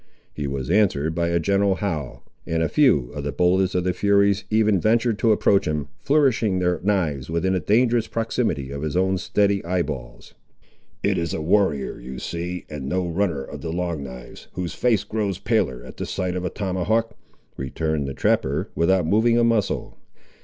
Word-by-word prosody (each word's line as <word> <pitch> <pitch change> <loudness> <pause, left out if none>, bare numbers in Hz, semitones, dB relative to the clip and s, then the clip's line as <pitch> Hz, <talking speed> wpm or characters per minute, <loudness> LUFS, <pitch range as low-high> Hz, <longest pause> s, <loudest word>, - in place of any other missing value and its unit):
He 75 -2 -4
was 70 +2 -3
answered 85 -7 +2
by 85 +1 0
a 85 0 +1
general 100 +2 +2
howl, 75 - -4 0.2
and 80 0 0
a - - 0
few 75 - +3
of 75 -1 -5
the 70 - -2
boldest 90 +1 +2
of 90 - +1
the 90 0 0
furies 100 +1 +2
even 110 -3 +3
ventured 115 0 +2
to 115 - +3
approach 100 -1 +3
him, 75 -2 -2
flourishing 130 -9 +2
their 90 -1 +1
knives 85 -9 0
within 85 +3 0
a 95 - +1
dangerous 115 +6 +2
proximity 110 - -2
of 70 0 -5
his 80 +3 -2
own 95 0 +1
steady 100 +1 +1
eye 90 +1 0
balls. 65 -7 -8 0.7
"It - - +1
is 85 -1 -2
a - - -3
warrior 85 -5 +1
you 65 +1 -8
see, 90 +4 -5
and 70 -3 -6
no 90 -1 0
runner 85 -5 -1
of - - -9
the 80 - -4
Long 85 -3 -2
knives, 65 -2 -10
whose 90 -2 -4
face 120 -4 +1
grows 105 -4 -2
paler 100 - 0
at - - -11
the - - -4
sight 90 -1 -2
of 90 - -3
a - - 0
tomahawk," 105 +4 -1 0.4
returned 75 +2 -2
the 70 - -5
trapper, - - 0
without 90 +1 +2
moving 110 +6 +3
a 120 - +4
muscle. 115 -3 0
90 Hz, 190 wpm, -23 LUFS, 75-105 Hz, 0.7 s, a